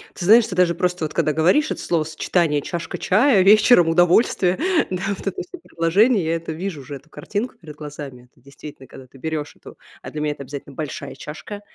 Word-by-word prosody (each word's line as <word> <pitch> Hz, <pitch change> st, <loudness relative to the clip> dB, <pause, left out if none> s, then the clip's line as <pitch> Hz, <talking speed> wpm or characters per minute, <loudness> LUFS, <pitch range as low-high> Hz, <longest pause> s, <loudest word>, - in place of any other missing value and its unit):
Ты 175 Hz, -, -5 dB
знаешь, 225 Hz, +4 st, +7 dB
ты 185 Hz, -, -6 dB
даже 180 Hz, -2 st, +3 dB
просто 180 Hz, -1 st, -1 dB
вот 155 Hz, -, -6 dB
когда 155 Hz, -, +1 dB
говоришь, 180 Hz, -, +2 dB
это -, -, -4 dB
словосочетание 160 Hz, -1 st, 0 dB
"чашка 170 Hz, +3 st, -5 dB
чая", 215 Hz, +1 st, +3 dB
вечером 205 Hz, -2 st, +6 dB
удовольствие, 175 Hz, +2 st, +3 dB, 0.3 s
да, 185 Hz, -1 st, -3 dB
вот 200 Hz, -, -5 dB
это 195 Hz, -, -3 dB
всё 365 Hz, -, -10 dB
предложение, 195 Hz, +6 st, +2 dB
я 165 Hz, +1 st, 0 dB
это 165 Hz, -1 st, -5 dB
вижу 165 Hz, -1 st, -5 dB
уже 140 Hz, +2 st, -8 dB
эту 140 Hz, +3 st, -14 dB
картинку 210 Hz, +9 st, -5 dB
перед 155 Hz, -3 st, -11 dB
глазами. 145 Hz, -4 st, -9 dB
Это -, -, -29 dB
действительно, 140 Hz, -1 st, -12 dB
когда 130 Hz, -, -13 dB
ты 135 Hz, -, -18 dB
берешь 155 Hz, +1 st, -4 dB
эту, -, -, -14 dB, 0.3 s
а -, -, -8 dB
для 150 Hz, -, -5 dB
меня 150 Hz, -1 st, -1 dB
это 140 Hz, -, -10 dB
обязательно 140 Hz, 0 st, -9 dB
большая 140 Hz, -1 st, -6 dB
чашка, 205 Hz, +7 st, -9 dB
165 Hz, 205 wpm, -21 LUFS, 150-190 Hz, 0.3 s, знаешь